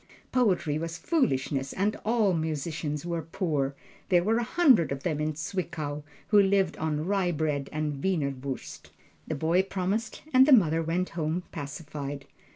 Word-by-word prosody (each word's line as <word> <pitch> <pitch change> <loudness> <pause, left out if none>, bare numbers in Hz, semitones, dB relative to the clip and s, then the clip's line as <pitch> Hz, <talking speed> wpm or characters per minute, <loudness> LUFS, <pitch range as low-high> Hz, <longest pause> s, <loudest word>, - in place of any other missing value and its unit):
Poetry 185 - +2
was 165 +1 -4
foolishness 135 - 0
and 205 +3 0
all 220 -4 +2
musicians 155 -1 -2
were 170 -1 -2
poor 150 -4 -1 0.3
there 175 -2 +4
were 225 +4 +2
a - - 0
hundred 250 - +4
of 135 0 -4
them 155 -4 -1
in 155 +1 -1
Zwickau 160 -3 -4 0.3
who 210 -1 +7
lived 195 -1 +2
on 155 -1 -1
rye 190 -2 +1
bread 150 -3 -1
and 150 -2 -3
wienerwurst. 140 -7 -3 0.4
The 160 - -2
boy 165 +5 +2
promised 195 +4 -3
and 260 +1 +7
the 295 - +7
mother 165 -8 +5
went 170 +3 -1
home 165 +1 -2
pacified. 140 -1 -6
165 Hz, 155 wpm, -28 LUFS, 150-190 Hz, 0.4 s, who